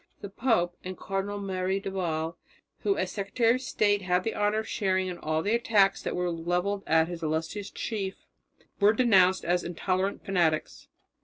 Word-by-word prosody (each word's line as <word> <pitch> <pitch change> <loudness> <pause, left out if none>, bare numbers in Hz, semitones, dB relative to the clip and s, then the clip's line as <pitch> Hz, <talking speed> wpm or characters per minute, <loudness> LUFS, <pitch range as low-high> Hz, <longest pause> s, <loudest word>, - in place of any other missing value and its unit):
The 200 - -6
pope 195 -6 +1
and 185 0 -6
Cardinal 195 +1 -3
Merry 190 -1 -1
del 195 -1 -6
Val, 165 -3 -2 0.4
who 400 -1 0
as - - -1
secretary 225 +3 +1
of 255 - -2
state 205 -5 +1
had 180 -1 +1
the 225 - -2
honour 210 +1 +1
of 220 - -10
sharing 190 -3 0
in 175 - -6
all 155 +1 -1
the 205 - +1
attacks 210 -4 +3
that - - -3
were 180 0 0
levelled 175 +4 -1
at 160 0 +4
his 175 -1 -6
illustrious 160 +6 -2
chief, 195 -4 -4 0.5
were 205 +1 +5
denounced 190 -6 +4
as 175 +1 +1
intolerant 185 +3 -2
fanatics. 170 -6 0
190 Hz, 175 wpm, -28 LUFS, 175-205 Hz, 0.5 s, were